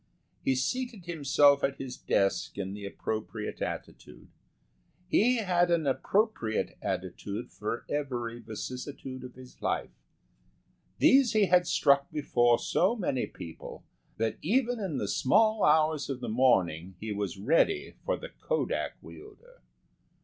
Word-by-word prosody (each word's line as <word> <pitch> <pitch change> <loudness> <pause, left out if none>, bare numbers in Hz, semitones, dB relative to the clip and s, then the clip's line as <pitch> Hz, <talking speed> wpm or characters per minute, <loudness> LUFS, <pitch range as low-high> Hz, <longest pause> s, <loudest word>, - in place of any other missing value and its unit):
He 130 - +2
seated 230 - -2
himself 145 -3 +4
at 135 0 0
his 130 -2 -6
desk 100 0 0
in 95 -1 -3
the 100 -1 -6
appropriate 110 +2 -5
attitude. - - -7 0.8
He 235 +6 +4
had 180 -5 +2
an 170 -3 +2
appropriate 140 - 0
attitude 100 +5 -4
for 110 +3 -4
every 120 -5 -3
vicissitude 130 +4 -7
of 125 -1 -10
his 130 0 -14
life. - - -1 1.1
These 260 -3 +5
he 215 -2 +4
had 180 -1 +4
struck 140 0 +3
before 120 -5 +2
so 195 +7 +1
many 155 - -1
people 80 -2 -10 0.3
that 115 0 -1
even 245 - +1
in 185 -9 -3
the - - -2
small 215 +9 +3
hours 155 -1 +3
of 135 -2 -3
the 125 - -5
morning 95 -8 +2
he 110 0 -5
was 100 -2 -3
ready 165 - +2
for - - 0
the - - -8
kodak - - -2
wielder. 475 +5 -14
140 Hz, 135 wpm, -29 LUFS, 115-190 Hz, 1.1 s, These